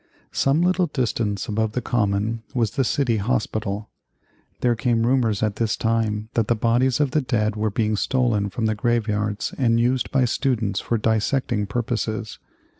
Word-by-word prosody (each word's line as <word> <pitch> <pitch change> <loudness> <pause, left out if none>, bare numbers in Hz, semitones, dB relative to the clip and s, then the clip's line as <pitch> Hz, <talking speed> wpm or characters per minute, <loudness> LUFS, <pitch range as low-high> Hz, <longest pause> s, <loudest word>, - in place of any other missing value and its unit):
Some 140 +5 +2
little 180 0 +2
distance 115 -7 -1
above 110 0 -1
the 125 - 0
Common 110 0 0
was 115 -4 +1
the 135 - 0
City 125 -2 +1
Hospital. 105 -2 -2 0.7
There 120 -1 +3
came 115 -1 +1
rumors 120 -5 +1
at 105 -1 0
this 115 -1 0
time 110 -1 0
that 115 -3 +1
the 120 - +2
bodies 120 +3 +2
of 145 -3 +1
the 155 - +2
dead 110 -4 0
were 110 0 0
being 105 +1 0
stolen 110 -3 +1
from 110 +3 -3
the 110 - +2
graveyards 105 -2 -1
and 115 -3 +3
used 125 +2 +1
by 135 - +2
the - - +4
students 115 -6 0
for 115 - -1
dissecting 110 0 0
purposes. 110 0 -3
115 Hz, 170 wpm, -23 LUFS, 105-125 Hz, 0.7 s, the